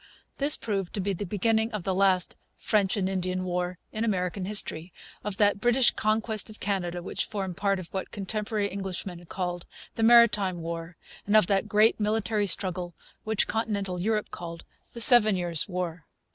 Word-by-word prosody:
This 285 +2 +2
proved 195 -5 -3
to - - -2
be 195 +1 -1
the 195 +2 -5
beginning 220 +4 +1
of 210 -4 -3
the 190 - -1
last 185 -1 +2 0.2
'French 205 -2 +1
and 190 -2 0
Indian 185 -1 -2
War' 180 0 -2
in 215 - -3
American 185 -3 -1
history, 185 -4 -1 0.3
of 205 -2 -3
that 205 -1 +2
'British 240 +2 +4
Conquest 215 0 -1
of 215 - -12
Canada' 180 -3 -2
which - - -2
formed 195 -4 -4
part 200 +1 0
of 185 -2 -7
what 190 - -3
contemporary 210 +1 -2
Englishmen 185 -2 -4
called 175 -1 -4 0.3
the - - -4
'Maritime 225 -5 +5
War,' 165 0 -6 0.3
and 205 - +2
of 215 - +5
that 195 +2 0
great 215 +1 +4
military 215 0 0
struggle 180 -2 -1 0.3
which 220 -1 +2
continental 200 -5 -2
Europe 215 +2 -1
called 170 -1 -8 0.3
the 235 - -7
'Seven 220 -4 +7
Years' 175 -1 0
War.' 180 -3 -4
195 Hz, 175 wpm, -27 LUFS, 180-215 Hz, 0.3 s, Seven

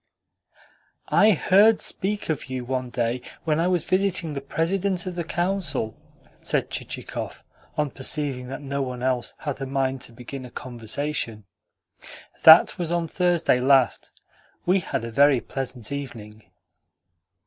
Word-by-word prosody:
"I 210 - +5
heard 205 +6 +5
speak 205 0 -2
of 155 - -1
you 130 -1 -4
one 130 0 -2
day 120 0 -1 0.2
when 155 -1 +1
I 170 - +2
was 180 -3 +1
visiting 185 -4 0
the 140 - -4
President 180 +5 -1
of 185 - -4
the 175 -1 -3
Council," 170 - -1 0.5
said - - 0
Chichikov, - - -5 0.3
on 150 -2 0
perceiving 135 -2 -2
that 135 +3 -7
no 140 0 -2
one 125 -2 -4
else 130 -2 -1
had 140 -2 -5
a 135 - -3
mind 135 -1 -1
to 120 - -6
begin 125 +3 -8
a 125 - -9
conversation. 120 -1 -4 1.0
"That 160 +3 +8
was 170 -2 -2
on 170 -1 0
Thursday 175 -6 +2
last. 130 -1 +3 0.5
We 185 +2 +4
had 140 -9 -3
a 115 - -6
very 140 +2 +5
pleasant 125 -3 -5
evening." 110 -6 -7
140 Hz, 145 wpm, -24 LUFS, 125-170 Hz, 1.0 s, That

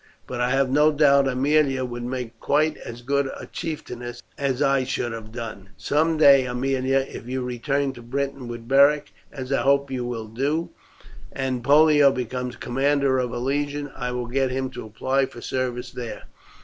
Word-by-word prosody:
But 125 -1 -4
I 125 - +2
have 135 0 +2
no 150 +3 +5
doubt 140 -2 +4
Aemilia 135 0 +2
would 120 -1 -6
make 120 -2 -5
quite 155 +2 +2
as 120 +1 -9
good 140 +2 +1
a - - -7
chieftainess 120 -7 -6
as 135 -2 -1
I 140 -2 +3
should 125 -2 -2
have 110 -1 -8
done. 110 -4 -7
Some 160 +2 +1
day, 140 -4 +6
Aemilia, 130 +2 +1
if 115 - -9
you 130 0 -2
return 135 +3 -1
to 120 - -11
Britain 135 +1 -3
with 120 -1 -7
Beric, 140 +3 +4 0.2
as 135 -1 -5
I - - +2
hope 140 0 +2
you 125 -2 -2
will 120 -2 -4
do, 140 +9 -1 0.6
and 130 -2 -2
Pollio 145 0 +6
becomes 125 0 -4
a - - -17
commander 135 +1 +1
of 125 -2 -1
a 120 - -4
legion, 145 +3 -2
I 125 -1 -3
will 125 0 -3
get 130 +2 0
him 130 0 -2
to 125 -3 -7
apply 130 +5 0
for 120 - -12
service 125 0 -3
there. 120 -2 -6
130 Hz, 185 wpm, -24 LUFS, 125-140 Hz, 0.6 s, day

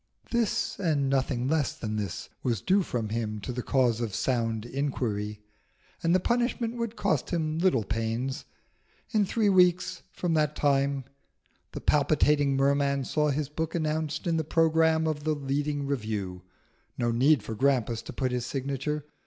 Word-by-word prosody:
This, 235 -3 0
and 145 -7 +1
nothing 130 -2 0
less 150 -1 0
than 110 -1 -3
this, 100 -4 -4
was 120 -5 0
due 195 - +3
from 120 - -3
him 110 -1 -2
to 115 - -4
the 125 0 -3
cause 125 -3 +2
of 110 -5 -2
sound 115 -3 0
inquiry; 115 -6 -2 0.6
and 170 +2 +3
the - - +4
punishment 240 +2 0
would 230 -1 -3
cost 160 - 0
him 160 -2 -1
little 170 - +3
pains. 115 +6 -2 0.7
In 215 -3 +3
three 220 +1 +1
weeks 180 -1 +3
from 175 -2 -1
that 150 -1 +1
time 140 -1 +1 0.7
the - - -5
palpitating 145 -1 +3
Merman 140 0 +2
saw 150 +3 +1
his 145 0 -1
book 160 +3 -3
announced 155 -1 -1
in 165 -2 +1
the 160 - 0
programme 160 0 +3
of 155 -2 -2
the 155 0 +1
leading 145 +1 -2
Review. 105 -9 -3 0.6
No 120 -1 +1
need 130 +1 +4
for 110 - -5
Grampus 120 -2 +1
to - - -8
put 130 -2 -1
his 125 -1 -1
signature. 140 +3 -3
140 Hz, 160 wpm, -28 LUFS, 120-160 Hz, 0.7 s, the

